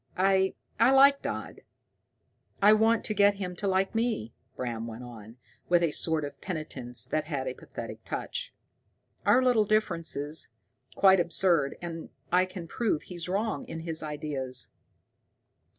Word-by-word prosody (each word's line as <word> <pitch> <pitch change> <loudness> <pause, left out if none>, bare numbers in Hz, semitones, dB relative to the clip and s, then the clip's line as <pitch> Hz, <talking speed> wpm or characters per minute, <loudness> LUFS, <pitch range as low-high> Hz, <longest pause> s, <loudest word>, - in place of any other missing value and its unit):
I 190 0 +3 0.2
I 230 - +6
like 275 +1 +6
Dodd. - - -5 1.0
I 205 +2 +7
want 225 +1 +3
to 215 - -1
get 200 -1 +4
him 185 -2 -5
to 200 - -2
like 190 0 +1
me," 225 - -1 0.2
Bram 115 -2 -4
went 115 +2 -8
on, 115 -1 -11 0.3
with 175 0 +4
a 165 - +2
sort 160 -1 0
of 145 - -9
penitence 145 -9 -4
that 155 0 -1
had 140 -4 -3
a 130 - -2
pathetic - - -9
touch. 485 0 -4 0.8
"Our 255 - +5
little 245 -4 +4
differences 165 -8 0 0.5
quite 190 -1 +6
absurd, 170 -4 +2
and 165 -1 -6 0.2
I 180 +1 +4
can 185 -2 -8
prove 205 -3 -1
he's 175 -1 -7
wrong 210 +4 -1
in 165 0 -6
his 160 -1 -3
ideas. 140 -5 -4
175 Hz, 150 wpm, -28 LUFS, 145-200 Hz, 1.0 s, I